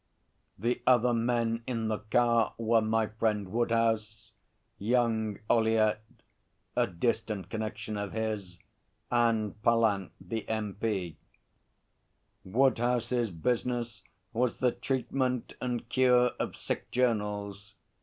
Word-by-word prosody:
The 120 +5 -1
other 125 -1 +5
men 115 0 +1
in 115 -3 -1
the 110 -1 -1
car 115 +1 +2
were 115 0 +3
my 110 0 +1
friend 105 -3 -1
Woodhouse, 110 -2 0 0.5
young 110 -2 +1
Ollyett, 110 -2 +3 0.8
a - - +3
distant 110 +1 -2
connection 110 -1 -4
of 100 -1 -3
his, 105 -5 -3 0.5
and 115 -3 +1
Pallant, 110 -5 +2
the 105 +4 -5
M.P. 105 -5 -2 1.3
Woodhouse's 120 +1 +1
business 120 +5 -2 0.3
was 120 +1 0
the 125 -1 +2
treatment 130 -1 -1
and 120 -2 -2
cure 125 0 +4
of - - -2
sick - - -4
journals. 105 -4 -1
115 Hz, 105 wpm, -30 LUFS, 105-120 Hz, 1.3 s, other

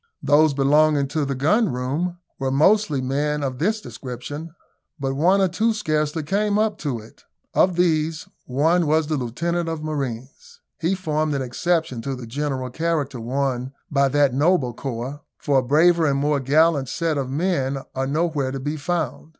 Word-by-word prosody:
Those 150 0 +4
belonging 145 +1 +3
to 155 -1 -1
the 135 0 -2
gun 160 - +2
room 145 +9 -2 0.2
were 135 -1 -1
mostly 155 +1 +3
men 145 +3 -1
of 130 -2 -3
this 215 +7 +1
description, 145 - -7 0.5
but 135 -1 -1
one 180 +7 +3
or 190 - +4
two 225 +5 +1
scarcely 155 -6 -1
came 205 +6 +1
up 215 -1 0
to 140 -6 -2
it. 110 0 -14 0.3
Of 180 -1 +3
these 160 -2 +1 0.2
one 160 +6 +2
was 155 +1 +3
the 155 +1 -1
lieutenant 165 +7 -2
of 160 -2 -4
marines. 135 -4 -5 0.2
He 170 +4 +1
formed 155 -4 -1
an 135 - -1
exception 160 0 -1
to 135 +3 -3
the 125 -2 -8
general 130 0 -3
character 150 -4 -1
won 130 +1 -2 0.2
by 140 -1 +3
that 140 -1 +2
noble 145 -3 +2
corp 135 +4 -5
for 140 -3 +2
a - - -2
braver 160 +5 +4
and 140 -1 +1
more 145 +1 +1
gallant 145 0 +3
set 165 0 -1
of 130 -2 -3
men 140 -3 0 0.2
are 135 0 -2
nowhere 150 -2 0
to 135 +1 -4
be 145 +3 -3
found. 160 0 -3
150 Hz, 175 wpm, -22 LUFS, 135-165 Hz, 0.5 s, Those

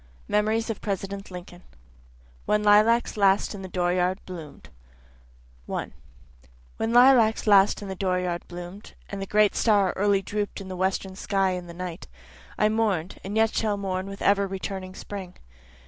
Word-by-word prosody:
MEMORIES 220 +2 +1
OF 225 - -7
PRESIDENT 195 0 -4
LINCOLN 180 -1 -10 0.9
When 210 0 +2
Lilacs 215 +3 +4
Last 195 0 +3
in 200 - -7
the 190 - -6
Dooryard 180 +1 +1
Bloom'd 165 -5 -10 1.0
1 - - -4 0.8
When 225 +1 -1
lilacs 240 -2 +5
last 200 -1 +5
in - - -7
the 190 - -4
dooryard 180 -2 -1
bloom'd, 175 +3 -9 0.2
And 200 -1 -5
the 195 - -4
great 210 0 +3
star 205 -4 +3
early 200 0 +2
droop'd 205 0 -3
in 195 -1 -8
the 185 - -5
western 190 +1 -1
sky 195 -1 0
in 180 -1 -5
the 170 - -10
night, 180 -1 -6 0.5
I 210 - +3
mourn'd, 210 -6 -1
and 200 +3 -4
yet 225 0 +3
shall 210 -2 0
mourn 190 -1 -3
with 195 0 -7
ever 200 0 +3
returning 190 -1 -5
spring. 190 -3 -8
195 Hz, 160 wpm, -25 LUFS, 185-210 Hz, 1.0 s, lilacs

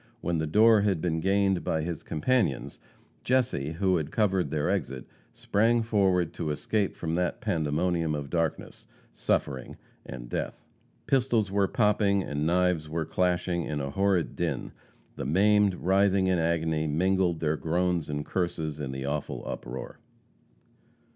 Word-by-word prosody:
When 85 -2 -1
the 80 - -1
door 110 +6 +5
had 100 -4 +1
been 80 -1 -1
gained 95 0 +1
by 80 -1 -1
his 85 -1 -4
companions, 95 - -1 0.4
Jesse, 120 - 0
who 95 +1 +1
had 80 -2 -3
covered 95 -3 +1
their 75 -2 -1
exit, 65 -1 -2 0.3
sprang 115 +3 +1
forward 95 -6 +1
to 80 - -3
escape 100 +7 -1
from 80 -1 -3
that 90 +5 -1
pandemonium 85 -5 0
of 70 -1 -6
darkness, 85 -3 -2 0.2
suffering 65 -2 -2 0.3
and - - -8
death. - - -4 0.4
Pistols 120 -6 +1
were 100 -1 +2
popping 105 -4 +2
and 75 0 -2
knives 90 -3 +1
were 80 0 -2
clashing 90 0 0
in 75 - -3
a 70 -1 -3
horrid 95 0 +1
din. - - -2 0.5
The 70 - -4
maimed, 100 +4 +3
writhing 95 +1 +2
in 95 -2 +2
agony, 80 -1 0
mingled 90 +2 +1
their 80 -1 0
groans 85 +1 -1
and 75 0 -3
curses 80 -4 -2
in 70 -3 -4
the 65 0 -5
awful 75 +1 -3
uproar. 60 +2 -6
85 Hz, 150 wpm, -28 LUFS, 75-100 Hz, 0.5 s, door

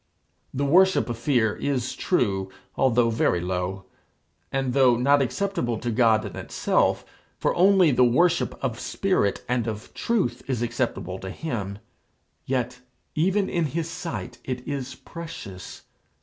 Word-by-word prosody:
The 140 +2 -1
worship 185 +1 +4
of 115 - -4
fear 120 -4 +2
is 130 -3 -1
true, 95 - 0 0.3
although 120 -2 +3
very 110 -5 +2
low; 90 +2 -3 0.7
and 135 -2 -1
though 130 -3 +5
not 140 +3 +4
acceptable 135 - -1
to 120 +2 -3
God 110 -2 +3
in - - -7
itself, - - 0 0.3
for - - +1
only 185 -2 +5
the 125 0 +4
worship 170 +8 +3
of 120 -3 -2
spirit 185 - 0
and 120 -2 0
of 110 0 -6
truth 185 - 0
is 125 -3 -1
acceptable 120 -6 -2
to 95 - -6
him, 100 -6 -4 0.7
yet 125 -1 -1 0.3
even 190 +5 +2
in 170 -2 0
his 160 +3 -2
sight 165 0 -6
it 125 -1 -5
is 135 -2 -4
precious. 160 - -9
125 Hz, 140 wpm, -25 LUFS, 115-160 Hz, 0.7 s, though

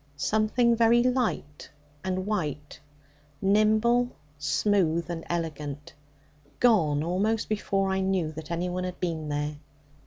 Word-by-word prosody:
Something 220 - +2
very 235 +1 +4
light 245 - -1 0.3
and 185 0 -2
white, 150 -9 -3 0.6
nimble, 215 +4 +3 0.3
smooth, 170 +3 +1
and 165 -1 -5
elegant, 150 -4 -4 0.7
gone 160 -12 +3
almost 205 +6 0
before 195 -2 0
I 190 - 0
knew 190 -4 0
that 155 0 -9
any 170 +1 -1
one 180 +1 -3
had 180 0 -5
been 160 -4 -3
there. 150 0 -2
185 Hz, 120 wpm, -27 LUFS, 155-215 Hz, 0.7 s, very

